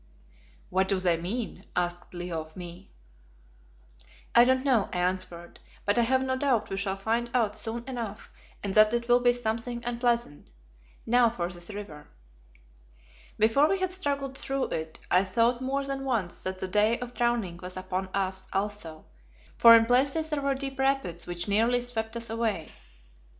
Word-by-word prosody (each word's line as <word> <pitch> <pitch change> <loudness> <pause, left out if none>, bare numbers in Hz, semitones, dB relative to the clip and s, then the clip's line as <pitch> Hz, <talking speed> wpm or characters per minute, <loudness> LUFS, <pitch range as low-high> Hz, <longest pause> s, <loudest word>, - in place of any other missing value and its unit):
"What 190 +1 +2
do 195 - +1
they 180 -2 +2
mean?" 200 +8 -4
asked 175 0 -2
Leo 175 -2 -3
of 155 +2 -13
me. 175 +1 -9 1.4
"I 235 - +8
don't 260 +1 +2
know," 245 -7 +3
I - - -3
answered; 180 -1 -3 0.3
"but 205 +3 +2
I - - +5
have 260 +3 +2
no 260 0 0
doubt 260 -4 0
we 195 - -2
shall 195 -1 -1
find 230 +4 -1
out 220 -4 +2
soon 225 +2 -3
enough 230 -5 -6 0.3
and 200 -2 -2
that 215 +2 +6
it 235 0 -2
will 245 0 +5
be 245 0 +4
something 235 0 -3
unpleasant. 235 -8 -1 0.5
Now 240 0 +4
for 175 -6 -3
this 175 -1 -6
river." 200 -8 -8 1.3
Before 225 +8 +4
we 390 - +2
had 375 -1 -1
struggled 280 -7 -3
through 270 0 -1
it 160 0 -4
I 180 +1 +5
thought 235 +5 +1
more 275 +2 -1
than 275 0 -3
once 225 -10 -2
that 185 0 -3
the 185 - -4
day 210 +4 +2
of 245 0 -7
drowning 235 -8 0
was 185 0 -6
upon 185 0 -3
us 190 -1 -2
also, 195 -5 -3 0.5
for 230 0 +9
in 225 0 +5
places 280 +6 +2
there 295 -1 0
were 275 0 +1
deep 270 0 -5
rapids 270 -11 0
which 175 +1 -2
nearly 225 +4 +3
swept 230 -2 -4
us 230 0 -1
away. 225 -6 -2
225 Hz, 170 wpm, -28 LUFS, 185-245 Hz, 1.4 s, for